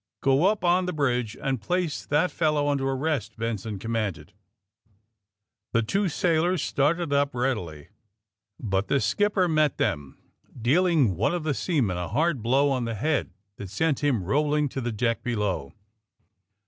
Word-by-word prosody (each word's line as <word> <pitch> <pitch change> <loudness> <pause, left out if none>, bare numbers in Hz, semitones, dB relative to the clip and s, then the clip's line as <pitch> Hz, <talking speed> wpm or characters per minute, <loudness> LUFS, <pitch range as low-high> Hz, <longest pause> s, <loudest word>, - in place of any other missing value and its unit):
''Go 140 +8 +4
up 215 -4 -5
on 180 +1 +3
the 180 - -2
bridge 125 -7 -1
and 135 -4 -2
place 180 -3 -2
that 155 +5 +2
fellow 150 -3 +1
under 135 -2 0
arrest!" 135 -5 -2
Benson 110 -2 -3
commanded. 105 -6 -3 1.4
The 115 - +3
two 195 - 0
sailors 170 +1 +1
started 150 +2 0
up, 140 -1 +1
readily. 100 - -2 0.7
But 100 -2 -1
the 140 - +2
skipper 205 +3 +1
met 155 -3 +2
them, 70 -2 -2 0.4
dealing 145 - +3
one 110 - +1
of 175 - -3
the 155 -2 0
seamen 130 - 0
a 90 -1 -3
hard 145 - 0
blow 135 +5 +2
on 130 -3 0
the 115 -1 -3
head 140 +4 0 0.3
that 100 - -7
sent 145 - 0
him 130 -9 +1
rolling 150 +7 +1
to 135 - -4
the 120 0 -2
deck 115 +1 -1
below. 105 - -2
135 Hz, 155 wpm, -26 LUFS, 115-155 Hz, 1.4 s, Go